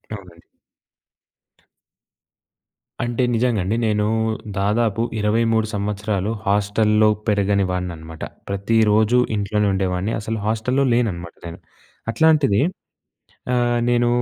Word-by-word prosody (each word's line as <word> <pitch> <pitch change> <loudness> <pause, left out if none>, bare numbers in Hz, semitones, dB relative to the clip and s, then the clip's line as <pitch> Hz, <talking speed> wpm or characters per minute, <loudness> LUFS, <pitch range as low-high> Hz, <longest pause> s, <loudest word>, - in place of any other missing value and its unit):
అవునండి. 90 -4 -13 2.6
అంటే 120 +1 -1
నిజంగా 120 -2 +1
అండి. 100 +5 -1
నేను 105 -1 +1 0.5
దాదాపు 110 +2 +1 0.2
23 110 +1 +1
సంవత్సరాలు 105 0 -2 0.2
హాస్టల్‍లో 105 +1 +3 0.2
పెరగని 100 -1 +2
వాడిని 90 -1 -3
అనమాట. 80 0 -10 0.3
ప్రతిరోజు 110 +3 +2 0.2
ఇంట్లోనే 105 +1 0
ఉండేవాడిని. 95 +2 -1
అసలు 110 +1 -3
హాస్టల్‌లో 120 +5 +1
లేననమాట 90 -8 -1
నేను. 85 - -9 0.5
అట్లాంటిది 150 -8 +3 0.9
ఆహ్, 120 -1 +2
నేను 120 0 +2
105 Hz, 95 wpm, -21 LUFS, 100-115 Hz, 2.6 s, హాస్టల్‍లో